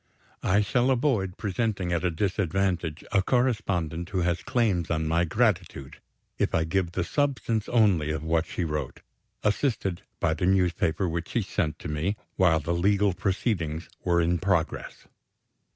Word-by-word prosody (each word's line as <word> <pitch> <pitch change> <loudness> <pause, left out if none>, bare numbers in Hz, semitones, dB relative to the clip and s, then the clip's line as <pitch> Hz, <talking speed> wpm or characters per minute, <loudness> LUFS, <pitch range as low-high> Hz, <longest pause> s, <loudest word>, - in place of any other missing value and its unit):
I 100 +3 +3
shall 125 +5 +1
avoid 120 -8 +1
presenting 100 -3 -1
at 85 0 0
a 90 - +2
disadvantage 90 -2 -1
a 100 - +4
correspondent 95 - 0
who 95 -3 -1
has 85 -1 0
claims 100 -5 0
on 80 -1 0
my 85 +2 +2
gratitude, 90 - 0 0.4
if - - +1
I 80 - +2
give 85 +1 -1
the 90 - 0
substance 125 - -1
only 100 -10 +3
of 80 0 -2
what 80 +1 +1
she 90 - -3
wrote 75 -5 -3 0.4
assisted 105 -5 0 0.2
by 80 - +2
the 85 +3 -1
newspaper 90 -2 +2
which 85 0 -3
she 115 - 0
sent 80 -5 -2
to - - -7
me, 75 +7 -1 0.2
while 85 -4 +4
the 85 +3 -2
legal 100 +3 +2
proceedings 90 -5 -2
were 85 -1 +3
in 85 +1 +1
progress. 90 -3 -1
90 Hz, 155 wpm, -27 LUFS, 80-105 Hz, 0.4 s, a